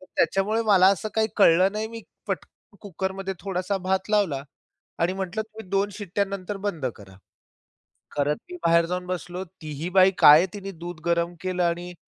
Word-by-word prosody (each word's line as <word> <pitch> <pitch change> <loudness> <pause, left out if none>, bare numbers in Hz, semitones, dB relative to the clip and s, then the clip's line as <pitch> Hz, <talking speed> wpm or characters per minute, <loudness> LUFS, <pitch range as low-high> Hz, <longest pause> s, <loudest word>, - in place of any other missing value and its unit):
तर 185 - -16
त्याच्यामुळे 210 +4 +2
मला 195 -4 +5
असं 200 +3 -4
काही 220 0 +2
कळलं 185 0 +5
नाही. 215 +1 -3
मी 230 0 -9 0.2
पटकन 205 - -7
कुकरमध्ये 190 0 -4
थोडासा 190 0 -2
भात 190 +2 -1
लावला 185 -10 +1 0.6
आणि 170 +2 +1
म्हंटलं 190 +2 -3
तुम्ही 220 -2 -12
2 200 +1 +1
शिट्ट्यानंतर 200 0 -3
बंद 160 -9 -3
करा. 95 -2 -14 1.0
खरं 145 +1 +1 0.2
मी 360 - -7
बाहेर 170 0 +5
जाऊन 180 +1 -3
बसलो. 180 0 -4
ती 160 -3 -11
ही 175 - -2
बाई 190 +1 +5
काय 150 +1 +9
आहे, 180 - +2
तिने 195 -1 -6
दूध 170 -1 -8
गरम 170 0 0
केलं 185 -1 -1
आणि 175 +1 -2
185 Hz, 175 wpm, -25 LUFS, 175-200 Hz, 1.0 s, काय